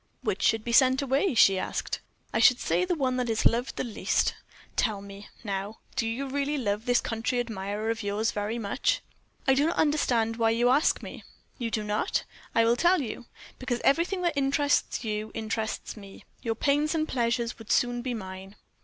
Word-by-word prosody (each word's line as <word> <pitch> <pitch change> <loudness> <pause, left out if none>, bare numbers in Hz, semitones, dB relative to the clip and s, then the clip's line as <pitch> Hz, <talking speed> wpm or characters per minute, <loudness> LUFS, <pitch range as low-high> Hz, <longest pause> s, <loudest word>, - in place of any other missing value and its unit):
"Which - - -1
should 225 -1 +2
be 235 - -3
sent 260 +2 +5
away?" 275 +4 +1
she 195 -3 +6
asked. - - -3 0.3
"I - - +2
should - - +6
say 365 - +1
the 360 -1 0
one 260 -4 0
that 250 -2 -1
is 225 -1 0
loved 240 +3 +2
the - - -2
least. 235 -4 0 0.4
Tell 215 -4 +1
me, 200 +1 -10 0.2
now, 200 0 -4 0.2
do 235 -4 0
you 240 +5 -2
really 285 +2 -1
love 215 -2 -2
this 245 0 +4
country 225 +2 -2
admirer 215 -1 -2
of 230 - -3
yours 205 +2 0
very 210 +3 -2
much?" 260 - 0 0.5
"I 265 - +6
do 285 +3 +3
not 335 - 0
understand 240 -7 +2
why 225 -1 +3
you 235 +2 +3
ask 280 +5 +3
me." - - -8 0.4
"Do 235 -2 -2
you - - -4
not? 210 0 0 0.3
I 230 - +5
will 230 +1 +4
tell 350 +5 +4
you. 240 -2 -5 0.3
Because 250 -2 -2
everything 350 +6 +2
that 345 -2 +2
interests 280 -1 +1
you 215 -1 -3
interests 220 0 -3
me; 200 -2 -12 0.2
your 230 -3 -1
pains 295 +6 +1
and 310 -1 0
pleasures 235 -2 -1
would 225 - -6
soon 245 0 +2
be 250 -1 -3
mine." 190 -1 -8
235 Hz, 195 wpm, -28 LUFS, 220-270 Hz, 0.5 s, she